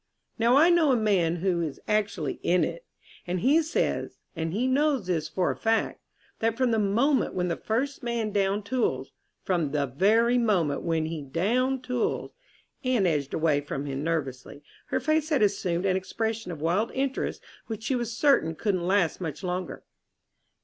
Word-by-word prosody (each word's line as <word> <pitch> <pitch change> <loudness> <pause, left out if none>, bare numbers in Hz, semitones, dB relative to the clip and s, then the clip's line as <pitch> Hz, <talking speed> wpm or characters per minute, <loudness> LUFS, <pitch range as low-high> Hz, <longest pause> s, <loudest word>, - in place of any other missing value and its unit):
Now 235 +3 +4
I 330 +4 +6
know 330 -5 +4
a - - +4
man 190 -7 +2
who 175 -3 +2
is 155 -4 -4
actually 205 -8 -1
in 180 +1 +2
it, - - -4 0.4
and 180 0 -2
he 295 - +4
says 320 +1 -1 0.2
and 160 0 -2
he 220 +8 0
knows 270 -3 +2
this 160 -4 -1
for 180 +3 0
a - - -4
fact 225 0 0 0.4
that 225 0 0
from 255 -2 +2
the 225 - +2
moment 235 +8 +2
when 180 -1 0
the 170 - 0
first 265 +6 -2
man 235 -3 -2
downed 200 0 0
tools 200 - -1 0.3
from 170 -6 0
the 145 -2 +1
very 220 - +3
moment 180 -11 +1
when 165 -2 0
he 160 -1 -4
downed 240 - 0
tools..." 250 -2 -2 0.5
Anne 250 -6 +2
edged 150 -5 0
away 155 -3 +2
from 145 -1 -5
him 140 0 -4
nervously. 145 -3 -3 0.2
Her - - 0
face 310 +3 +1
had 285 -8 +3
assumed 190 -3 0
an 190 -1 +2
expression 220 +1 -3
of 155 -4 -7
wild 180 +8 +1
interest 270 0 -2 0.2
which 220 -1 -6
she 265 - 0
was 240 -2 -2
certain 250 - +3
couldn't 185 -1 -1
last 190 -3 +1
much 160 +1 -5
longer. 180 0 -4
200 Hz, 175 wpm, -27 LUFS, 165-240 Hz, 0.5 s, I